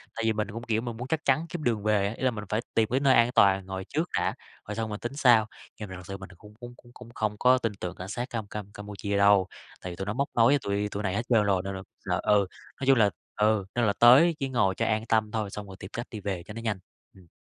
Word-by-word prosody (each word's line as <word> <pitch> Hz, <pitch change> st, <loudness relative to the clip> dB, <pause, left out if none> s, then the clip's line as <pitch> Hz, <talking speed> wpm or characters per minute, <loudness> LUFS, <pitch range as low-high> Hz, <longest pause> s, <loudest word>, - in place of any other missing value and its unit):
tại 115 Hz, -, -3 dB
vì 110 Hz, -, +3 dB
mình 105 Hz, -1 st, -2 dB
cũng, 115 Hz, +2 st, -7 dB
kiểu, 110 Hz, -2 st, 0 dB
mình 120 Hz, -1 st, -5 dB
muốn 125 Hz, +2 st, -6 dB
chắc 160 Hz, +3 st, -2 dB
chắn 140 Hz, +4 st, +2 dB
kiếm 170 Hz, -2 st, -5 dB
đường 115 Hz, -5 st, 0 dB
về 105 Hz, -2 st, +2 dB
á, 105 Hz, -, -3 dB
ý -, -, -7 dB
là 130 Hz, -, +3 dB
mình 105 Hz, -3 st, -6 dB
phải 110 Hz, +2 st, 0 dB
tìm 110 Hz, -1 st, +2 dB
cái 130 Hz, -, +2 dB
nơi 140 Hz, -1 st, +4 dB
an 120 Hz, +1 st, +4 dB
toàn 95 Hz, -1 st, +4 dB
ngồi 95 Hz, 0 st, -5 dB
trước 160 Hz, +3 st, -1 dB
đã, -, -, 0 dB, 0.3 s
rồi 105 Hz, -, -4 dB
xong 110 Hz, 0 st, -2 dB
mình 105 Hz, 0 st, -5 dB
tính 120 Hz, +2 st, -5 dB
sau. 120 Hz, -6 st, +5 dB, 0.3 s
Nhưng 105 Hz, -3 st, -6 dB
mà 95 Hz, -, -7 dB
thật 90 Hz, -, -9 dB
sự 100 Hz, -, -5 dB
mình 95 Hz, 0 st, -10 dB
cũng 105 Hz, +3 st, -15 dB
cũng 120 Hz, 0 st, -9 dB
cũng 120 Hz, -, -19 dB
cũng 125 Hz, -2 st, -12 dB
không 110 Hz, -1 st, -1 dB
có 130 Hz, +1 st, +5 dB
tin 115 Hz, -3 st, -1 dB
tưởng 90 Hz, -, -5 dB
cảnh 90 Hz, -, -7 dB
sát 120 Hz, +4 st, -4 dB
Cam 110 Hz, -3 st, -4 dB
Cam 100 Hz, -1 st, -7 dB
Campuchia 100 Hz, -1 st, -4 dB
đâu, 100 Hz, -2 st, +5 dB, 0.3 s
tại 90 Hz, -, -6 dB
vì -, -, -7 dB
tụi 95 Hz, -, -5 dB
nó 105 Hz, -, -2 dB
móc 140 Hz, +4 st, 0 dB
nối 115 Hz, -, +5 dB
với 145 Hz, -, +4 dB
tụi 100 Hz, 0 st, -1 dB
tụi 100 Hz, +1 st, -4 dB
này 95 Hz, -1 st, -1 dB
hết 115 Hz, -, 0 dB
trơn 115 Hz, -4 st, +4 dB
rồi 100 Hz, -2 st, +2 dB
nên 95 Hz, 0 st, -4 dB
là 95 Hz, -, -7 dB, 0.4 s
ờ, -, -, +3 dB
ừ, 100 Hz, -, -1 dB, 0.3 s
nói 135 Hz, -, -2 dB
chung 135 Hz, -1 st, +6 dB
là 105 Hz, -3 st, +5 dB, 0.3 s
ừ, 105 Hz, -2 st, +2 dB
nên 120 Hz, -1 st, +2 dB
là 100 Hz, -, +2 dB
tới 140 Hz, +8 st, +7 dB
chỉ 135 Hz, -2 st, -2 dB
ngồi 95 Hz, -7 st, +1 dB
cho 115 Hz, -, -1 dB
an 110 Hz, -1 st, 0 dB
tâm 110 Hz, -1 st, +2 dB
thôi 110 Hz, -2 st, -2 dB
xong 105 Hz, 0 st, -7 dB
rồi 95 Hz, -, -10 dB
tìm 95 Hz, -, -8 dB
cách 120 Hz, -, -5 dB
đi 110 Hz, -, -6 dB
về 95 Hz, -3 st, -4 dB
cho 105 Hz, -, -10 dB
nó 115 Hz, -, -7 dB
nhanh. 110 Hz, -4 st, -2 dB, 0.4 s
Ừm. 95 Hz, -3 st, -18 dB
110 Hz, 305 wpm, -27 LUFS, 100-120 Hz, 0.4 s, tới